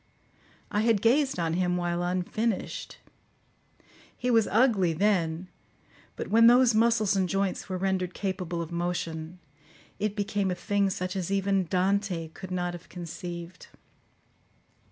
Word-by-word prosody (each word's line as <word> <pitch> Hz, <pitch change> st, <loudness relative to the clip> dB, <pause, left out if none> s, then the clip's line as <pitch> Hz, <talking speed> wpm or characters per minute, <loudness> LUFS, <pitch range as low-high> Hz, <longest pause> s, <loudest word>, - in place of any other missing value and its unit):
I 210 Hz, -, +1 dB
had 225 Hz, -2 st, +3 dB
gazed 270 Hz, +2 st, +3 dB
on 165 Hz, -2 st, 0 dB
him 180 Hz, 0 st, +1 dB
while 175 Hz, 0 st, -1 dB
unfinished; 185 Hz, +5 st, -2 dB, 1.2 s
he 250 Hz, -, 0 dB
was 225 Hz, -2 st, +4 dB
ugly 210 Hz, -7 st, +3 dB
then, 175 Hz, -2 st, +1 dB, 0.7 s
but -, -, -5 dB
when 230 Hz, +2 st, +6 dB
those 245 Hz, 0 st, +6 dB
muscles 220 Hz, -2 st, +3 dB
and 190 Hz, -2 st, +1 dB
joints 195 Hz, +1 st, -1 dB
were 185 Hz, -, -2 dB
rendered 185 Hz, -1 st, -1 dB
capable 180 Hz, -3 st, -3 dB
of 165 Hz, -, -10 dB
motion, 170 Hz, -1 st, -3 dB, 0.6 s
it 210 Hz, -1 st, -1 dB
became 205 Hz, -1 st, -1 dB
a 180 Hz, -, -1 dB
thing 200 Hz, +2 st, 0 dB
such 185 Hz, 0 st, -3 dB
as 185 Hz, -2 st, -2 dB
even 195 Hz, -1 st, +1 dB
Dante 185 Hz, -2 st, 0 dB
could 185 Hz, +3 st, -10 dB
not 175 Hz, -1 st, -2 dB
have 175 Hz, -, -10 dB
conceived. 175 Hz, 0 st, -7 dB
185 Hz, 135 wpm, -28 LUFS, 175-205 Hz, 1.2 s, when